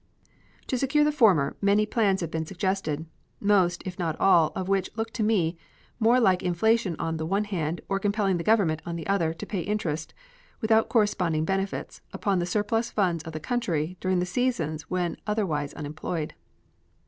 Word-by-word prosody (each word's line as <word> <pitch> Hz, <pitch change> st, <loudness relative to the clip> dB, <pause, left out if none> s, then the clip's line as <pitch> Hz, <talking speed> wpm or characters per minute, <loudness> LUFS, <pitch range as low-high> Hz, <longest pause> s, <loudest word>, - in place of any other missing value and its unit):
To 255 Hz, -, -1 dB
secure 275 Hz, +3 st, +3 dB
the 300 Hz, -, +3 dB
former 195 Hz, -, +4 dB
many 205 Hz, +1 st, +3 dB
plans 205 Hz, -4 st, +1 dB
have 165 Hz, -2 st, -3 dB
been 160 Hz, -1 st, -3 dB
suggested, 180 Hz, -4 st, -2 dB, 0.3 s
most, 190 Hz, -4 st, +2 dB
if 185 Hz, 0 st, -6 dB
not 165 Hz, -3 st, -2 dB
all, 170 Hz, -5 st, +5 dB
of 185 Hz, -, -3 dB
which 195 Hz, -1 st, +1 dB
look 225 Hz, 0 st, -3 dB
to 230 Hz, -, -3 dB
me 180 Hz, -6 st, +1 dB, 0.4 s
more 235 Hz, +2 st, +4 dB
like 190 Hz, -6 st, +3 dB
inflation 185 Hz, +2 st, +1 dB
on 165 Hz, -1 st, -2 dB
the 160 Hz, -, -3 dB
one 200 Hz, +4 st, +1 dB
hand, 175 Hz, -5 st, -3 dB
or 195 Hz, 0 st, 0 dB
compelling 200 Hz, -2 st, +1 dB
the 170 Hz, -, -3 dB
Government, 185 Hz, -8 st, +2 dB
on 170 Hz, -, -5 dB
the 165 Hz, -, -5 dB
other, 185 Hz, -5 st, +1 dB
to -, -, -7 dB
pay 200 Hz, -, -3 dB
interest, 170 Hz, -5 st, -3 dB, 0.4 s
without 220 Hz, 0 st, +3 dB
corresponding 180 Hz, -8 st, +1 dB
benefits, 195 Hz, +2 st, -3 dB
upon 195 Hz, -3 st, 0 dB
the 175 Hz, -, -1 dB
surplus 225 Hz, +4 st, 0 dB
funds 175 Hz, -7 st, 0 dB
of 160 Hz, -, -7 dB
the 155 Hz, -, -4 dB
country 175 Hz, -5 st, -1 dB
during 185 Hz, 0 st, 0 dB
the 180 Hz, -, +1 dB
seasons 180 Hz, -8 st, -1 dB
when 180 Hz, -2 st, -1 dB
otherwise 165 Hz, -10 st, -1 dB
unemployed. 155 Hz, +1 st, -4 dB
190 Hz, 180 wpm, -26 LUFS, 165-210 Hz, 0.4 s, all